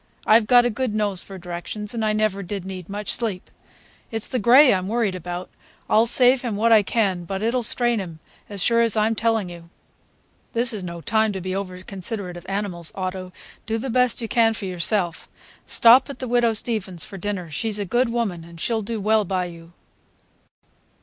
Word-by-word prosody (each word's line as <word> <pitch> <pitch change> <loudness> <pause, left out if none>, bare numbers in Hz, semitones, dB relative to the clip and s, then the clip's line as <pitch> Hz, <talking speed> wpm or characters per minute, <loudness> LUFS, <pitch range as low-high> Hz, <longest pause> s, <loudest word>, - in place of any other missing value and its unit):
"I've 215 0 +5
got 245 0 +6
a 245 - +1
good 235 -1 -2
nose 205 -4 0
for 195 - -10
directions, 180 +4 -5
and 230 -2 -2
I 215 - +2
never 215 -2 0
did 195 0 -5
need 185 -2 -7
much 205 +1 -3
sleep. 210 -6 -3 0.6
It's 225 -1 -4
the 255 - -2
gray 250 +4 +7
I'm 185 -1 -1
worried 220 -2 0
about. 180 0 -5 0.4
I'll 225 +2 +4
save 250 +1 +5
him 235 -5 -3
what 230 +3 +2
I 220 -2 +7
can, 195 -4 0
but 195 +4 -4
it'll 240 +3 +1
strain 240 0 +1
him, 170 -5 -7 0.3
as 200 -3 -3
sure 235 0 +3
as 230 -2 +2
I'm 215 +1 +2
telling 225 -2 0
you!" 170 -1 -11 0.8
"This 235 +1 +1
is 205 -3 -5
no 170 -1 -6
time 220 +3 +1
to 190 - -4
be 185 +1 -4
over 185 -2 -5
considerate 195 -1 -4
of 175 +1 -11
animals, 195 -4 -3
Otto; 185 -1 -4 0.4
do 225 0 0
the 250 +3 -4
best 250 0 +1
you - - -2
can 225 0 +3
for 205 - -5
yourself. 180 -1 -1 0.4
Stop 245 +4 +6
at 280 - -7
the 255 - -5
Widow 240 -1 +2
Steavens's 210 -6 -3
for 195 - -9
dinner. 185 -4 -4
She's 215 +7 -1
a 205 - -2
good 240 +5 +1
woman, 220 -8 -2
and 170 0 -13
she'll 225 +4 0
do 225 +1 -4
well 215 +1 +2
by 185 -1 -1
you." 170 -1 -11
210 Hz, 205 wpm, -23 LUFS, 185-230 Hz, 0.8 s, gray